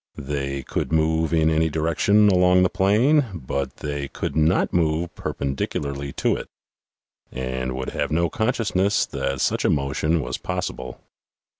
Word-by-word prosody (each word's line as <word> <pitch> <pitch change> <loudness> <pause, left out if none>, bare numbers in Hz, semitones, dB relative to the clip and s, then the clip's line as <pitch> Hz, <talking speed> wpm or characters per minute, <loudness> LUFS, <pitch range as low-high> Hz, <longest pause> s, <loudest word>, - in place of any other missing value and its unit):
They 70 -1 -3
could - - -3
move 80 0 +1
in 80 -1 +3
any 80 +1 +2
direction 85 +7 +3
along 90 -1 +4
the 90 - +2
plane, 120 +11 +3
but 65 -3 -4
they 70 -1 -3
could 70 - -5
not 80 +3 +2
move 85 0 0
perpendicularly 70 0 -3
to - - +1
it, - - -8 0.8
and 65 0 -3
would 65 0 -4
have - - -2
no 85 +2 +1
consciousness 105 -2 +1
that 70 0 -3
such - - +1
a - - +3
motion 75 +4 +1
was 60 -4 -4
possible. - - -4
80 Hz, 145 wpm, -23 LUFS, 70-90 Hz, 0.8 s, along